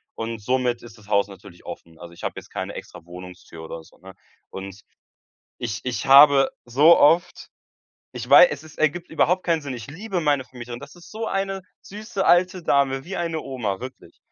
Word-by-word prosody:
Und 115 0 -5
somit 125 +2 -1
ist 120 -1 -13
das 105 -2 -19
Haus 100 -1 +2
natürlich 95 -3 -15
offen. 80 -1 -10
Also, 85 -1 -11
ich 85 - -15
habe - - -2
jetzt - - -10
keine - - -5
extra 85 - -10
Wohnungstür 90 -2 -11
oder 80 0 -8
so, - - -22
ne? 95 +1 -13 0.4
Und 95 +2 -9 0.8
ich 115 -4 -4
ich 120 -4 -3
habe 135 0 +7 0.2
so 145 +8 +6
oft 165 +5 +2 0.6
ich - - -7
wei - - +9
es - - -6
ist 155 - -15
ergibt 155 +3 0
überhaupt 180 +3 +1
keinen 165 -3 +1
Sinn. 140 - -5
Ich 115 -2 -8
liebe 185 +5 -4
meine 145 -4 +1
Vermieterin, 120 -2 -9
das - - -12
ist 175 - -15
so 225 +1 -4
eine 195 0 -2 0.2
süße 205 -1 -5
alte 180 0 +3
Dame, 135 -2 +1
wie 190 +4 -6
eine 165 -2 -2
Oma, 110 -10 -4
wirklich. 130 +1 -11
135 Hz, 195 wpm, -23 LUFS, 105-170 Hz, 0.8 s, wei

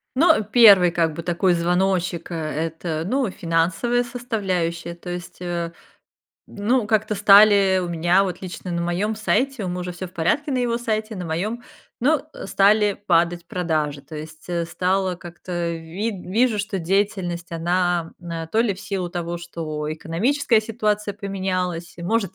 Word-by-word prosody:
Ну, 285 -5 +4
1 205 -5 +7
как 165 -2 +1
бы 170 - -6
такой 175 +2 +2
звоночек, 180 +1 0
э, - - -3
это 160 +1 -3
ну, 255 +1 +1
финансовая 180 +8 0
составляющая, 190 -9 -2
то 170 +1 -10
есть, 175 -1 -6
э, 170 -1 -3 0.8
ну, 220 +3 0
как-то 215 0 +1
стали 200 -1 +6
у 175 - -3
меня 175 +3 +3
вот 185 -2 -3
лично 185 0 -6
на 170 0 -1
моем 180 +6 -1
сайте- 250 +2 0
у - - -2
мужа 180 0 -4
всё 180 +1 -6
в 180 - -15
порядке 285 - 0
на 260 - +1
его 235 -1 0
сайте- 220 -2 -2
на 180 - -5
моем, 205 +9 -3 0.4
ну, 285 +3 +3
э, - - -8
стали 205 +1 +4 0.2
падать 170 0 +2
продажи. 155 -5 -1
То 145 +3 -12
есть, 155 +1 -9
э, 170 -1 -1
стало 185 +1 0
как-то 175 0 -5
вид 180 +5 -5
вижу, 220 +3 +2
что 200 -1 -3
деятельность 180 -1 -1
она 175 0 0
на 165 -2 -5
то 215 +8 +1
ли 230 -3 +2
в - - -14
силу 195 -3 -3
того, 175 -1 -4
что 155 -3 -5
экономическая 220 - +1
ситуация 210 -2 -1
поменялась, 185 -4 -3
может, 195 +2 -1
180 Hz, 160 wpm, -22 LUFS, 170-210 Hz, 0.8 s, 1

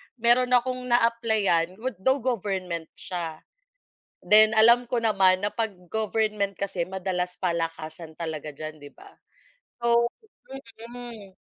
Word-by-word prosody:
meron 250 +1 +3
akong 250 0 0
na-applyan, 220 -7 +2
gu 250 +6 -4
though 260 +4 +1
government 190 -8 -2
siya. 165 -3 -6 0.8
Then, 215 +3 +7
alam 235 +2 +6
ko 245 - 0
naman 195 -4 +3
na 205 - -2
'pag 220 -5 -2 0.2
government 215 -2 -1
kasi 185 -3 -3
madalas 180 -1 -3
palakasan 165 -2 -4
talaga 160 -3 -5
diyan, 155 +1 -9
di 145 - -10
ba? - - -17 0.7
So 235 0 +3 0.8
mm, 235 -5 -9
200 Hz, 120 wpm, -25 LUFS, 175-235 Hz, 0.8 s, Then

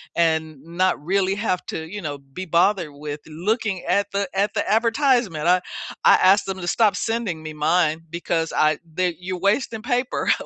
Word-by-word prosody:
and 160 -3 0
not 170 0 0
really 190 +3 +1
have 200 -4 -1
to, 160 - -5
you 205 0 -5
know, 145 -2 -4
be 140 +7 -8
bothered 170 0 +2
with 145 +1 -6
looking 190 +4 -2
at 200 +3 +1
the 200 0 -1
at 200 +2 +1
the - - -1
advertisement. 230 - +2
I 180 +1 +4 0.4
I - - +8
asked 195 +2 +4
them 195 -1 -4
to 175 - -5
stop 210 +1 +3
sending 225 -8 -2
me 155 0 -7
mine 160 +1 +1
because 165 -1 -2
I 155 0 +3
they 175 +1 -1
you're 180 0 -5
wasting 215 +4 0
paper. 245 +2 0
180 Hz, 180 wpm, -22 LUFS, 160-205 Hz, 0.4 s, I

